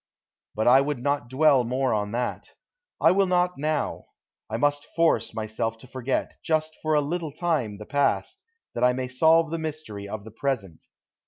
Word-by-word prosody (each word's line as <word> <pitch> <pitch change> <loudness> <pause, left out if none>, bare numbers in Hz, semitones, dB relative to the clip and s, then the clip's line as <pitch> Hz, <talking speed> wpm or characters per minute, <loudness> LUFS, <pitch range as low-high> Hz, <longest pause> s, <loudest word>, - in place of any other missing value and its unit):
But 110 - 0
I 130 +2 +7
would 145 0 -1
not 140 -1 -1
dwell 135 -1 +4
more 130 +2 0
on 105 -1 -1
that. 120 +1 -3 0.4
I 165 - +5
will 195 +1 +3
not 180 -2 +1
now. 150 0 -1 0.4
I 110 - -2
must 145 +3 0
force 160 -9 +2
myself 110 +1 -3
to 115 - -14
forget, 130 +1 -3
just 155 0 0
for 155 0 +1
a 150 - +4
little 160 +1 -3
time, 145 - -1
the 105 - -9
past, 140 +1 0 0.3
that - - -2
I 125 0 +5
may 130 0 -3
solve 160 +5 +3
the 165 - -2
mystery 145 -11 -6
of 110 0 -5
the 110 - -11
present. 110 - -3
135 Hz, 180 wpm, -25 LUFS, 115-155 Hz, 0.4 s, I